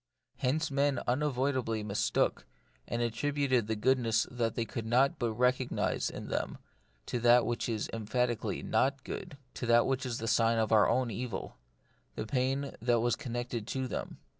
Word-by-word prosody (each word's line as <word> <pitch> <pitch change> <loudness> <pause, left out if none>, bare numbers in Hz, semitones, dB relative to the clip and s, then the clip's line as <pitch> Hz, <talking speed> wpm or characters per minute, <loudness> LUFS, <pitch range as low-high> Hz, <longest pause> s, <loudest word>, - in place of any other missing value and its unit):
Hence 145 +4 0
men 140 -1 +2
unavoidably 130 -4 0
mistook, 105 -1 0 0.4
and 120 0 -1
attributed 130 0 0
the 110 - 0
goodness 115 0 +2
they 115 -1 -1
could 115 +1 -5
not 130 +4 +3
but 115 -2 0
recognise 125 +2 +1
in - - -7
them - - -2 0.5
to 120 - -2
that 120 +1 +5
which 120 0 -2
is 110 -2 -1
em 110 -2 -5
phatically 115 -3 -1
not 135 +4 +1
good 140 - -6
— - - -40
to 120 - -4
that 120 0 +5
which 135 -1 0
is 125 -3 -3
the 115 - -4
sign 115 0 +3
of 110 0 +1
our 110 -2 +5
own 125 -2 +1
evil 115 -2 -5 0.3
— - - -39
the 110 - -3
pain 135 +3 -1
that 120 0 +3
was 120 -1 +2
connected 120 -2 -4
with 130 -2 -2
them. - - -4
120 Hz, 175 wpm, -31 LUFS, 115-130 Hz, 0.5 s, that